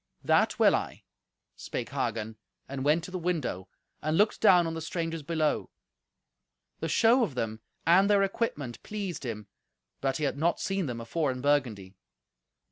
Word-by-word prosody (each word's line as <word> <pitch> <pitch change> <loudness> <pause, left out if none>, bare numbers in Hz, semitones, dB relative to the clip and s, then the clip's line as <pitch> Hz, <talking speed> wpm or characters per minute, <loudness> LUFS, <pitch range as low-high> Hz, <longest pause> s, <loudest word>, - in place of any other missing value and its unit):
"That - - +3
will - - +5
I," - - -4 0.5
spake - - -5
Hagen, 110 0 -3 0.3
and 135 -1 -4
went 155 +4 +3
to 180 - -8
the 185 - -3
window, 160 - -2 0.3
and 155 +2 0
looked 210 +2 +2
down 180 -5 +6
on 165 - -2
the 165 - -5
strangers 165 0 -3
below. 155 0 0 1.1
The - - -3
show 235 +3 +4
of 165 - -3
them 110 -2 -3 0.2
and 185 +5 +5
their 200 -1 +5
equipment 170 - -2
pleased 200 -8 -5
him, 105 -2 -5 0.6
but 135 -1 0
he 155 - -4
had 140 0 -1
not 170 +2 +1
seen 195 -4 -1
them 120 -2 -4
afore 145 +6 -1
in 130 - -5
Burgundy. 120 -10 0
155 Hz, 165 wpm, -29 LUFS, 130-180 Hz, 1.1 s, down